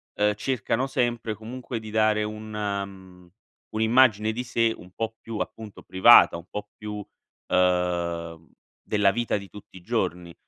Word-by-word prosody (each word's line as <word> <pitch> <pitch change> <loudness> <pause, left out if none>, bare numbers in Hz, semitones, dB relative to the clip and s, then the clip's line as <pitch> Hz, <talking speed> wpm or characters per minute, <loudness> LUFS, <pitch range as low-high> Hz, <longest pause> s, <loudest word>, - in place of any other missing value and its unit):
uhm, 105 0 +2
cercano 125 +2 -1
sempre 120 -4 -1
comunque 120 +2 -6
di 110 -1 -9
dare 110 -1 +2
un, 110 +1 -6
mhmm, 100 -3 -5 0.4
un'immagine 110 -1 +4
di 120 +3 -4
sé 115 -2 +1
un 90 - -14
po' 115 +1 -4
più 115 -1 -7
appunto 110 -2 -6
privata, 95 -1 +7
un 85 - -11
po' 105 0 -6
più, 105 0 -6 0.5
uhm, 85 -3 0 0.3
della 105 -2 +2
vita 120 +3 -1
di 100 -1 -9
tutti 105 - -14
i - - -13
giorni. 90 -5 -2
105 Hz, 150 wpm, -25 LUFS, 95-115 Hz, 0.5 s, privata